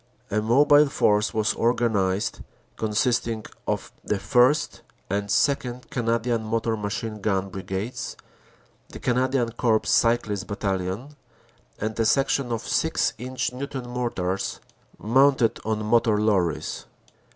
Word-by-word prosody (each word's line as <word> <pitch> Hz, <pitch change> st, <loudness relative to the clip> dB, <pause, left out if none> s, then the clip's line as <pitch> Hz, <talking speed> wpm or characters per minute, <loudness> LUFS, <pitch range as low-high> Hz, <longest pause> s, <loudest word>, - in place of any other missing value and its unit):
A 105 Hz, +1 st, +1 dB
mobile 145 Hz, +6 st, +5 dB
force 105 Hz, -4 st, +2 dB
was 110 Hz, -1 st, +1 dB
organized 105 Hz, -5 st, 0 dB, 0.4 s
consisting 115 Hz, 0 st, 0 dB, 0.2 s
of -, -, -2 dB
the -, -, 0 dB
1st. 120 Hz, +8 st, +2 dB, 0.3 s
and 100 Hz, 0 st, -1 dB
2nd. 125 Hz, 0 st, 0 dB
Canadian 115 Hz, -1 st, 0 dB
Motor 115 Hz, +1 st, -1 dB
Machine 105 Hz, +1 st, -4 dB
Gun 100 Hz, -2 st, 0 dB
Brigades, 95 Hz, +4 st, -5 dB, 0.7 s
the -, -, -9 dB
Canadian 125 Hz, -1 st, +1 dB
Corps 115 Hz, -2 st, +1 dB
Cyclist 110 Hz, -4 st, +1 dB
Battalion, 100 Hz, +6 st, -3 dB, 0.6 s
and 110 Hz, +1 st, -4 dB
a 115 Hz, -, +3 dB
section 135 Hz, -1 st, +1 dB
of 115 Hz, -1 st, -1 dB
6 160 Hz, 0 st, +1 dB
inch 125 Hz, 0 st, -3 dB
Newton 130 Hz, -1 st, -5 dB
Mortars 110 Hz, -7 st, -2 dB, 0.4 s
mounted 130 Hz, +1 st, +3 dB
on 110 Hz, 0 st, -2 dB
motor 115 Hz, -1 st, +3 dB
lorries. 95 Hz, -7 st, 0 dB
115 Hz, 115 wpm, -25 LUFS, 105-125 Hz, 0.7 s, mobile